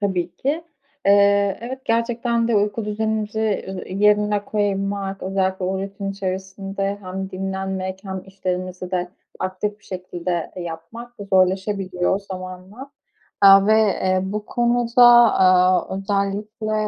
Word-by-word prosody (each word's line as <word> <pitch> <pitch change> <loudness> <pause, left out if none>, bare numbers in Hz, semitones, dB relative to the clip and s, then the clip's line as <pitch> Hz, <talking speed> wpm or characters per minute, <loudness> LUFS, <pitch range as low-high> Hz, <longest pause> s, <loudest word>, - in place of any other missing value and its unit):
Tabii 180 -3 -2
ki. 305 - -2 0.4
Eee, 200 -1 +4
evet, 260 +3 -7
gerçekten 235 0 0
de 225 - +2
uyku 205 +1 0
düzenimizi, 220 0 -2
eee, 190 -3 -3
yerine 210 0 +2
koymak, 195 -1 -2
özellikle 190 0 -1
o 190 +1 -1
rutin 195 0 -5
içerisinde 195 +1 -4
hem 190 0 -6
dinlenmek 190 0 -4
hem 190 -1 -5
işlerimizi 185 -1 -4
de 180 -1 -1 0.3
aktif 205 +3 -3
bir - - -27
şekilde 180 -2 -4
yapmak 175 +8 -8 0.2
zorlaşabiliyor 190 0 +1
zamanla. 190 +6 -9 0.5
Aaa, 195 0 +8
ve, 215 - +4
eee, 185 -3 +1
bu 210 +2 -4
konuda, 240 0 +3 0.3
aaa, 185 0 +3
özellikle, 205 +2 -2
195 Hz, 115 wpm, -21 LUFS, 185-210 Hz, 0.5 s, Aaa